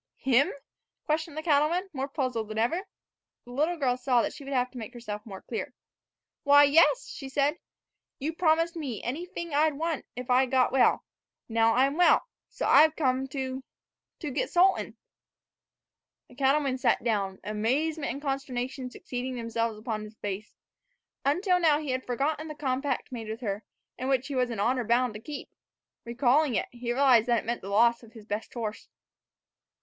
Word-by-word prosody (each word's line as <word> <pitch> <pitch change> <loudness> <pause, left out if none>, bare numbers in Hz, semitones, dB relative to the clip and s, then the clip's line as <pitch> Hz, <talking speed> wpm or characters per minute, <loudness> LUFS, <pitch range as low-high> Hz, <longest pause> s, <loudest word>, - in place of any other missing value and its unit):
"Him?" 265 +2 +3 0.5
questioned 310 0 -1
the 310 - -3
cattleman, 320 +4 +2
more 270 -1 -2
puzzled 255 -6 -2
than 215 0 -6
ever. 330 - 0 0.6
The 245 - -12
little 310 +7 0
girl 260 -5 +1
saw 250 -2 +2
that - - -2
she 285 - -10
would 275 - -7
have 250 -2 +1
to 255 - -8
make 230 +3 -8
herself 210 -3 -6
more 195 -3 -9
clear. 250 +2 -5 0.7
"Why, 285 0 +7
yes," 330 - +4
she 270 - -7
said. 285 +4 +1 0.6
"You 300 +4 -3
promised 330 +1 +2
me 270 - -5
anyfing 340 +4 -5
I 305 +2 +4
wanted 310 0 -3
if 250 0 -6
I'd 255 +1 +3
get 255 -1 +3
well; 260 -1 +3 0.4
now 225 0 +3
I'm 275 +4 +2
well, 355 +5 +5 0.2
so - - -4
I've 315 +1 +6
come 265 -3 0
to 265 -1 -4 0.5
to 300 -4 -5
get - - -1
Sultan." 370 +2 +2 1.3
The - - -16
cattleman 270 0 +1
sat - - +2
down, 200 -5 0
amazement 275 +9 -1
and 275 - -5
consternation 260 -2 -3
succeeding 250 +1 -5
each 230 -1 -6
other 230 -2 -1
on 215 -3 -2
his 215 +1 -13
face. 205 +1 -5 0.7
Until 360 +6 +2
now 315 -4 +4
he 300 -3 -3
had 255 0 -3
forgotten 290 +6 -1
the 305 - -7
compact 275 -1 -2
made 225 -3 -6
with 220 +3 -5
her, 205 -2 -3 0.4
and 260 - -2
which 265 -1 +1
he - - -4
was 250 -2 +1
in 230 -4 -4
honor 250 +4 +1
bound 235 +1 +2
to 210 - -7
keep. 285 +5 -8 0.5
Recalling 250 +3 +2
it, - - +1
he 240 0 -4
realized 250 -3 +4
that 235 -2 +2
it - - -16
meant 235 +1 -2
the 195 - -7
loss 235 +3 +4
of 230 -2 -16
his 220 -3 -12
best 210 +1 -4
horse. 220 -3 -5
260 Hz, 180 wpm, -28 LUFS, 235-295 Hz, 1.3 s, Why